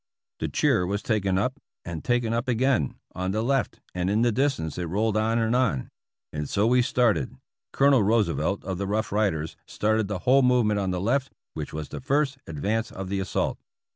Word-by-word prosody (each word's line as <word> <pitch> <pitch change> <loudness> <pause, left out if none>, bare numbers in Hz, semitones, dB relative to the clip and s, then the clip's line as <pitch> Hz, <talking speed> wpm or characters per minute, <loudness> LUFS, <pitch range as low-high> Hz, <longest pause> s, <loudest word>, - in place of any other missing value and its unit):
" - - -66
The - - -1
cheer 90 - +2
was 100 +2 -2
taken 100 -4 +1
up 125 +8 -1 0.3
and 85 -3 -5
taken 120 -2 +1
up 115 +2 -1
again, 125 - +1 0.2
on 95 0 -2
the 110 +3 0
left, 135 +1 0
and 90 0 -1
in 105 +3 +2
the 120 - +3
distance 125 - -1
it 90 - -2
rolled 105 +5 0
on 110 +1 +2
and 115 +1 +1
on. 115 - 0 0.4
And 75 -1 -3
so 100 +1 +2
we 125 +2 +4
started. 120 -2 +1 0.3
Colonel 135 -3 +4
Roosevelt, 100 -5 +1
of 95 -1 -3
the 100 - -2
Rough 110 +2 -1
Riders, 95 -7 0
started 110 0 0
the 105 -1 -2
whole 135 +2 +6
movement 120 -5 +3
on 95 -2 -1
the 90 -1 -1
left, 130 +7 0 0.2
which - - -5
was 75 -1 -5
the - - -6
first 140 0 0
ad 80 - -6
vance 110 +7 0
of 95 0 -6
the 100 0 -1
assault." 95 - -1
110 Hz, 205 wpm, -26 LUFS, 95-125 Hz, 0.4 s, whole